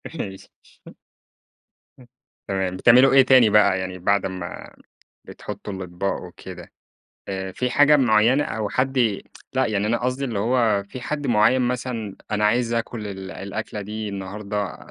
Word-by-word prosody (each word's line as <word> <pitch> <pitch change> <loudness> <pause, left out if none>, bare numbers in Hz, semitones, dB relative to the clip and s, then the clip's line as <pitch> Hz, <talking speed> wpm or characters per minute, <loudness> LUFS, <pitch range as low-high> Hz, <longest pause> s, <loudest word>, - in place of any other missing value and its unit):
ماشي. 95 -10 -7 1.5
إمم، 125 - -17 0.4
تمام. 95 -1 -2
بتعملوا 125 +6 +6
إيه 135 - +8
تاني 130 -4 +6
بقى 105 -2 +4
يعني 95 0 -5
بعد 100 +3 +1
أمَّا 90 -2 -7 0.5
بتحطّوا 105 0 -8
الأطباق 95 +1 -4
وكده؟ 90 -1 -11 0.6
آآ 95 -1 -4
في 125 +6 -2
حاجة 145 +3 +5
معيّنة 120 +2 +3
أو 110 -2 -3
حد 130 +4 -1
ي 115 -6 +1 0.3
لأ، - - +1
يعني 105 -1 -1
أنا 120 +2 +1
قصدي 130 +2 -1
اللي 115 -6 -3
هو 110 -2 +1
في 110 +6 -9
حد 145 +3 -4
معيّن 120 +2 +3
مثلًا 120 -4 -3
أنا 105 0 0
عايز 115 +2 +2
آكُل 115 -1 -3
ال 95 -1 -7
الأكلة 105 +2 -6
دي 105 +1 -5
النهارده، 100 +1 -5
105 Hz, 150 wpm, -23 LUFS, 100-125 Hz, 1.5 s, إيه